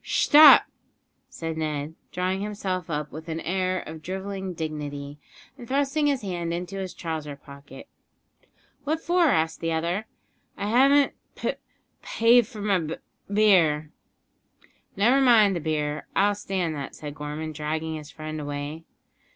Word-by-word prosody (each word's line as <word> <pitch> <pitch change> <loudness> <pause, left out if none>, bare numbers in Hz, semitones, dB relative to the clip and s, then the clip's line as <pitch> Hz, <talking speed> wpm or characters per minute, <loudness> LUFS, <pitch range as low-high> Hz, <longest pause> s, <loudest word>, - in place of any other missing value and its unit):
"Shtop!" 300 0 +8 0.7
said 165 -1 -5
Ned, 150 -1 -3 0.2
drawing 185 +1 -1
himself 190 -4 -3
up 150 -2 -3
with 160 +2 -9
an 160 0 -3
air 185 +1 -1
of 160 0 -9
drivelling 190 +1 -5
dignity, 145 -2 -5 0.4
and 240 - -10
thrusting 285 +3 +1
his 275 -5 0
hand 175 -3 -3
into 180 +3 -4
his 190 -2 -5
trouser 155 -4 -5
pocket. 140 -1 -13 1.0
"What 310 +3 -1
for?" 350 +1 +2
asked 160 - +1
the 165 0 -1
other. 170 +7 -2 0.5
"I 200 +1 -3
haven't 275 +4 +4 0.2
p - - -1 0.5
paid 235 0 +4
for 225 -4 -9
my 200 -2 +2
b 160 -1 -4 0.4
beer." 170 -8 +3 1.0
"Never 240 +8 +4
mind 220 -7 +5
the - - -1
beer. 150 -1 -2
I'll 205 +1 +3
stand 190 -5 -2
that," 140 -2 -6
said 150 -1 -7
Gorman, 150 +1 -5
dragging 155 +1 -3
his 150 -1 -7
friend 155 0 -6
away. 145 +2 -5
170 Hz, 145 wpm, -25 LUFS, 155-205 Hz, 1.0 s, Shtop